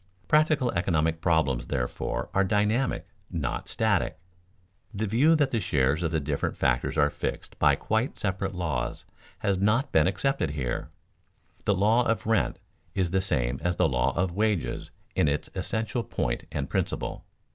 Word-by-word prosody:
Practical 150 Hz, -5 st, +3 dB
economic 80 Hz, -2 st, +1 dB
problems, 80 Hz, -7 st, +1 dB
therefore, 60 Hz, -1 st, -2 dB
are 100 Hz, -, +3 dB
dynamic, 105 Hz, +6 st, +1 dB, 0.2 s
not 80 Hz, -8 st, -3 dB
static. -, -, +1 dB, 0.7 s
The 110 Hz, 0 st, -2 dB
view 135 Hz, +11 st, +4 dB
that 145 Hz, -4 st, +2 dB
the 115 Hz, -, +1 dB
shares 70 Hz, -4 st, +1 dB
of 85 Hz, -, +1 dB
the 80 Hz, -, 0 dB
different 70 Hz, -1 st, -2 dB
factors 60 Hz, 0 st, +1 dB
are 75 Hz, 0 st, +4 dB
fixed -, -, -5 dB
by -, -, +5 dB
quite 110 Hz, +4 st, -1 dB
separate 95 Hz, -1 st, -2 dB
laws 65 Hz, -9 st, -2 dB, 0.4 s
has 100 Hz, -2 st, +2 dB
not 115 Hz, +8 st, +2 dB
been 80 Hz, -1 st, +4 dB
accepted 100 Hz, -, 0 dB
here. 65 Hz, -4 st, -3 dB, 0.8 s
The 100 Hz, -, +3 dB
law 110 Hz, +5 st, +4 dB
of 115 Hz, -, 0 dB
rent 110 Hz, -3 st, +1 dB, 0.4 s
is 90 Hz, -3 st, +1 dB
the 95 Hz, -, +2 dB
same 65 Hz, -9 st, 0 dB
as 90 Hz, 0 st, 0 dB
the -, -, +3 dB
law 60 Hz, -2 st, +1 dB
of 90 Hz, +1 st, +1 dB
wages 105 Hz, -3 st, 0 dB, 0.2 s
in -, -, +2 dB
its 70 Hz, +1 st, -1 dB
essential 110 Hz, +2 st, -2 dB
point -, -, -2 dB
and 70 Hz, -2 st, -2 dB
principle. -, -, -2 dB
95 Hz, 155 wpm, -27 LUFS, 75-110 Hz, 0.8 s, by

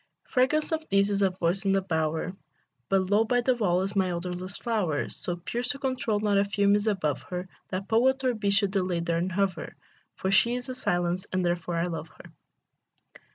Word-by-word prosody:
Fragrance 265 Hz, +5 st, +1 dB
of 315 Hz, 0 st, -2 dB
these 200 Hz, +1 st, +3 dB
is 200 Hz, 0 st, 0 dB
a 195 Hz, -, +4 dB
voice 180 Hz, +1 st, -1 dB
in 195 Hz, -1 st, +2 dB
a 195 Hz, -, +2 dB
bower: 160 Hz, 0 st, -1 dB, 0.6 s
But 190 Hz, 0 st, +1 dB
low 210 Hz, +2 st, +5 dB
by 245 Hz, +2 st, +1 dB
the 255 Hz, +2 st, +3 dB
wall 185 Hz, -6 st, +1 dB
is 195 Hz, +2 st, -4 dB
my 190 Hz, -2 st, +2 dB
odorless 180 Hz, +2 st, -4 dB
flower, 205 Hz, -, -1 dB
So 175 Hz, -, -3 dB
pure, 205 Hz, +7 st, -4 dB
so 250 Hz, +3 st, -1 dB
controlled, 255 Hz, -6 st, -1 dB
not 205 Hz, -2 st, +3 dB
a -, -, +4 dB
fume 200 Hz, 0 st, +2 dB
is 205 Hz, +1 st, +1 dB
above 165 Hz, -9 st, 0 dB
her, 180 Hz, +1 st, -4 dB, 0.2 s
That 190 Hz, +1 st, -4 dB
poet 260 Hz, +5 st, +3 dB
or 255 Hz, -1 st, +2 dB
bee 215 Hz, -3 st, -1 dB
should 200 Hz, -1 st, +2 dB
delay 185 Hz, -3 st, 0 dB
there 170 Hz, 0 st, 0 dB
and 180 Hz, +2 st, -1 dB
hover; 185 Hz, -3 st, -1 dB, 0.4 s
For 190 Hz, -, -2 dB
she 235 Hz, +5 st, +4 dB
is 250 Hz, +1 st, -5 dB
a -, -, -2 dB
silence, 180 Hz, -5 st, -1 dB
and 185 Hz, -1 st, 0 dB
therefore 175 Hz, 0 st, -1 dB
I 165 Hz, -, +1 dB
love 165 Hz, -2 st, -4 dB
her. -, -, -15 dB
195 Hz, 210 wpm, -27 LUFS, 180-220 Hz, 0.6 s, low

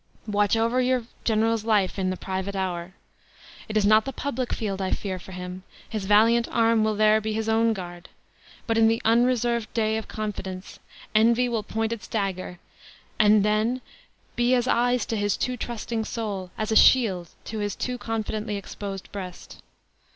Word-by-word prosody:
Watch 205 Hz, 0 st, +2 dB
over 230 Hz, +3 st, +2 dB
your 255 Hz, -1 st, +1 dB, 0.2 s
general's 225 Hz, 0 st, +1 dB
life 210 Hz, -4 st, +1 dB
in 185 Hz, -1 st, 0 dB
the 185 Hz, -, -2 dB
private 190 Hz, +2 st, -4 dB
hour. 180 Hz, -1 st, -3 dB, 0.7 s
It 215 Hz, -, 0 dB
is 210 Hz, -, +3 dB
not 215 Hz, +1 st, +6 dB
the 270 Hz, -, -3 dB
public 260 Hz, -1 st, -3 dB
field 200 Hz, -3 st, -2 dB
I 190 Hz, -, -1 dB
fear 185 Hz, -2 st, -3 dB
for 190 Hz, -, -12 dB
him; 180 Hz, 0 st, -7 dB, 0.3 s
his 215 Hz, -4 st, -4 dB
valiant 225 Hz, +4 st, +4 dB
arm 230 Hz, -1 st, +3 dB
will 215 Hz, 0 st, +1 dB
there 215 Hz, +1 st, +4 dB
be 215 Hz, 0 st, -2 dB
his 220 Hz, 0 st, -2 dB
own 225 Hz, +1 st, +3 dB
guard! 175 Hz, -3 st, -8 dB, 0.6 s
But, 225 Hz, -1 st, +1 dB
in 225 Hz, -, +6 dB
the 225 Hz, +1 st, +2 dB
unreserved 235 Hz, 0 st, +2 dB
day 220 Hz, -1 st, +1 dB
of 220 Hz, -, -5 dB
confidence, 195 Hz, -3 st, -6 dB, 0.3 s
envy 230 Hz, +3 st, +4 dB
will 235 Hz, -2 st, -1 dB
point 225 Hz, +2 st, -2 dB
its 230 Hz, -, -8 dB
dagger; 190 Hz, -4 st, -3 dB, 0.6 s
and 210 Hz, -1 st, +5 dB
then, 215 Hz, +4 st, +1 dB, 0.6 s
be 240 Hz, +1 st, +3 dB
as 245 Hz, 0 st, +1 dB
eyes 245 Hz, -1 st, +2 dB
to 225 Hz, -, -3 dB
his 205 Hz, -2 st, 0 dB
too 255 Hz, -, -1 dB
trusting 230 Hz, -1 st, -4 dB
soul 205 Hz, -6 st, -4 dB
as 215 Hz, 0 st, -2 dB
a -, -, +2 dB
shield 190 Hz, -12 st, +5 dB, 0.2 s
to 220 Hz, -, -5 dB
his 205 Hz, -2 st, -2 dB
too 250 Hz, -1 st, -3 dB
confidently 220 Hz, -2 st, -3 dB
exposed 195 Hz, -1 st, -7 dB
breast!" 185 Hz, -3 st, -8 dB
215 Hz, 175 wpm, -25 LUFS, 200-230 Hz, 0.7 s, not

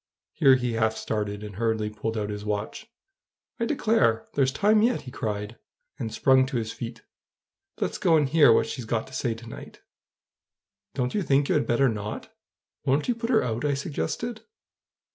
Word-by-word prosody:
Here 135 Hz, -1 st, +6 dB
he 125 Hz, -2 st, -1 dB
half 110 Hz, -1 st, +1 dB
started, 105 Hz, -1 st, -3 dB
and 105 Hz, -3 st, -8 dB
hurriedly 110 Hz, -1 st, 0 dB
pulled 110 Hz, +1 st, -4 dB
out 105 Hz, -1 st, -2 dB
his 105 Hz, 0 st, -5 dB
watch, 105 Hz, -, -4 dB, 0.7 s
"I 230 Hz, -, +1 dB
declare, 215 Hz, -, +2 dB
there's 135 Hz, -2 st, +2 dB
time 210 Hz, +8 st, +3 dB
yet!" 240 Hz, +3 st, +2 dB
he 125 Hz, -, -10 dB
cried, 105 Hz, -1 st, -4 dB, 0.4 s
and 110 Hz, -, -3 dB
sprung 130 Hz, +3 st, +4 dB
to 135 Hz, -2 st, -2 dB
his 110 Hz, -1 st, -2 dB
feet. 115 Hz, 0 st, -7 dB, 0.8 s
"Let's -, -, -2 dB
go 165 Hz, -2 st, +4 dB
and 150 Hz, -2 st, +2 dB
hear 145 Hz, -3 st, +6 dB
what -, -, +4 dB
she's 125 Hz, -, -6 dB
got 115 Hz, 0 st, -1 dB
to 130 Hz, -, -15 dB
say 120 Hz, -3 st, -1 dB
to 115 Hz, +1 st, -12 dB
night." 115 Hz, -, -10 dB, 1.1 s
"Don't 125 Hz, -1 st, -1 dB
you 210 Hz, -, 0 dB
think 140 Hz, -4 st, +2 dB
you -, -, +3 dB
had -, -, +1 dB
better 125 Hz, +3 st, +3 dB
not? 105 Hz, -3 st, -4 dB, 0.5 s
Won't 140 Hz, +3 st, +1 dB
you -, -, +4 dB
put 230 Hz, 0 st, -4 dB
her 230 Hz, -4 st, +4 dB
out?" 115 Hz, 0 st, -2 dB
I 145 Hz, -1 st, +1 dB
suggested. 160 Hz, -, -3 dB
120 Hz, 185 wpm, -26 LUFS, 110-145 Hz, 1.1 s, Here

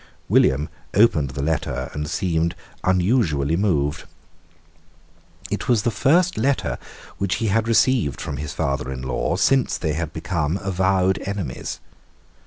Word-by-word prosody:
William 70 Hz, +3 st, +3 dB, 0.3 s
opened 90 Hz, -, +4 dB
the 65 Hz, +2 st, -4 dB
letter 80 Hz, +1 st, -2 dB
and 75 Hz, 0 st, -4 dB
seemed 85 Hz, -2 st, 0 dB, 0.3 s
unusually 90 Hz, -, +2 dB
moved. 80 Hz, -6 st, 0 dB, 1.5 s
It -, -, -3 dB
was 115 Hz, -4 st, +3 dB
the 120 Hz, -, +1 dB
first 175 Hz, +9 st, +2 dB
letter 140 Hz, 0 st, 0 dB, 0.4 s
which 95 Hz, -1 st, 0 dB
he 110 Hz, 0 st, -1 dB
had 110 Hz, +3 st, +1 dB
received 115 Hz, -, +2 dB
from 70 Hz, -, -4 dB
his 75 Hz, 0 st, -4 dB
father 70 Hz, -1 st, -2 dB
in 65 Hz, -1 st, -6 dB
law 65 Hz, +5 st, -1 dB
since 130 Hz, +8 st, +2 dB
they 80 Hz, -3 st, -1 dB
had 80 Hz, 0 st, -3 dB
become 80 Hz, 0 st, -1 dB
avowed 95 Hz, -1 st, +1 dB
enemies. 95 Hz, -10 st, -4 dB
90 Hz, 135 wpm, -22 LUFS, 75-105 Hz, 1.5 s, opened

